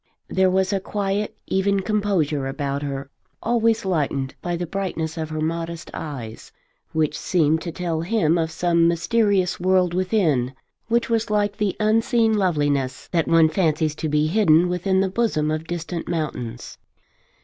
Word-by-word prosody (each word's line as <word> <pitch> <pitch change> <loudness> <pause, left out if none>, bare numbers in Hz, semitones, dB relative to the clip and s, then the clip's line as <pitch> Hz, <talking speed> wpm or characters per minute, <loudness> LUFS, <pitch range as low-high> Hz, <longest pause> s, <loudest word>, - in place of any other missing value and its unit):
There 190 0 +3
was 190 +1 +1
a 195 - +1
quiet 200 +1 -2
even 195 +1 +1
composure 190 -9 0
about 140 0 -3
her, 140 -1 -5 0.3
always 230 -1 +2
lightened 140 -7 -1
by 175 -1 -2
the 175 +1 -3
brightness 170 -3 -3
of 160 -2 -4
her 155 0 -3
modest 165 +1 -3
eyes, 125 -8 -7 0.4
which 155 -1 0
seemed 160 -2 +1
to 170 - -4
tell 165 -2 -2
him 175 -3 +2
of 165 -2 0
some 170 0 +2
mysterious 190 +2 +1
world 185 -1 +2
within, 175 - +1 0.3
which 235 +1 +1
was 230 -1 0
like 205 -1 0
the 210 -3 0
unseen 225 +1 +2
loveliness 145 -9 0
that 170 -2 +1
one 165 -1 +5
fancies 155 -3 +1
to 155 - -2
be 150 +1 +2
hidden 170 -1 +4
within 190 +2 +1
the 195 - +2
bosom 185 -8 0
of 155 +1 -3
distant 170 0 -4
mountains. 125 -8 -4
170 Hz, 155 wpm, -23 LUFS, 155-195 Hz, 0.4 s, one